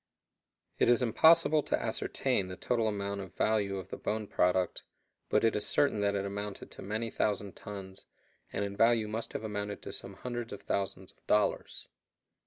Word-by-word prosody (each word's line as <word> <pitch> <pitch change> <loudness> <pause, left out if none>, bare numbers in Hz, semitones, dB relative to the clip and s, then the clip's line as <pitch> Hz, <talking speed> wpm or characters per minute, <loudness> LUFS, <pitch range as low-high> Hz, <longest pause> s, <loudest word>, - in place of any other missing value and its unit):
It - - +4
is 120 +1 +4
impossible 160 +5 +5
to - - 0
ascertain 95 - 0
the 90 - -6
total 115 +3 0
amount 100 -1 -2
or 95 - -6
value 100 +1 0
of 95 -1 -7
the - - -5
bone 110 0 -2
product, 90 -2 +1 0.5
but - - +3
it 115 - +3
is 105 - 0
certain 125 -7 +2
that 100 0 +2
it 100 0 -1
amounted 100 0 -5
to - - -10
many 110 +3 -3
thousand 100 -2 -1
tons, 95 -2 -9 0.4
and 100 - -1
in 100 0 -5
value 115 0 +4
must 110 +2 -4
have - - -4
amounted 105 -1 -4
to - - -6
some - - -7
hundreds 120 -2 -5
of 100 0 -9
thousands 95 -1 -2
of - - -33
dollars. 105 0 +1
105 Hz, 185 wpm, -31 LUFS, 100-115 Hz, 0.5 s, impossible